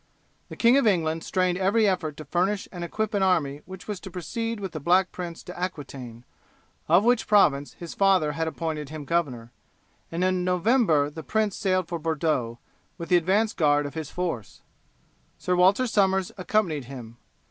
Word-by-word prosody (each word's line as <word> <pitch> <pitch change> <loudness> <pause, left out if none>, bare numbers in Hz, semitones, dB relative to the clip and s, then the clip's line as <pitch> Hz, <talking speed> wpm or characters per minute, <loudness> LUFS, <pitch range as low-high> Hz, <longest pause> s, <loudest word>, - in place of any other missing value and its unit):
The - - -8
King 240 +3 +5
of 275 - +3
England 165 -5 +1
strained 185 -1 0
every 205 +3 +3
effort 170 -6 -1
to 155 - -8
furnish 185 +6 0
and 175 -2 -6
equip 215 +6 -3
an 200 - +1
army 150 -7 +1
which 190 0 -10
was 205 -3 -4
to 190 - -9
proceed 225 +5 -4
with 195 -3 -5
the 155 - -5
Black 180 +5 +3
Prince 175 -2 -7
to 180 - -9
Aquitaine, 135 -9 -6 0.6
of 175 +5 +5
which 245 0 +2
province 145 -9 +3
his 170 -2 -9
father 190 -6 +3
had 160 +2 -2
appointed 155 -3 -4
him 155 -1 -7
governor, 130 -8 -2 0.6
and 170 +2 -1
in 185 -1 +1
November 180 - +2
the 160 +2 -7
Prince 215 +3 0
sailed 185 -3 0
for 170 - -4
Bordeaux, 150 -7 -1 0.4
with 165 -1 -7
the 180 - +6
advance 200 +6 +1
guard 145 -2 +2
of 145 - -6
his 160 -3 -5
force. 170 - -4 0.7
Sir 180 - -1
Walter 190 +8 +4
Somers 190 -5 +1
accompanied 180 - 0
him. 120 -3 -10
175 Hz, 180 wpm, -25 LUFS, 155-195 Hz, 0.7 s, the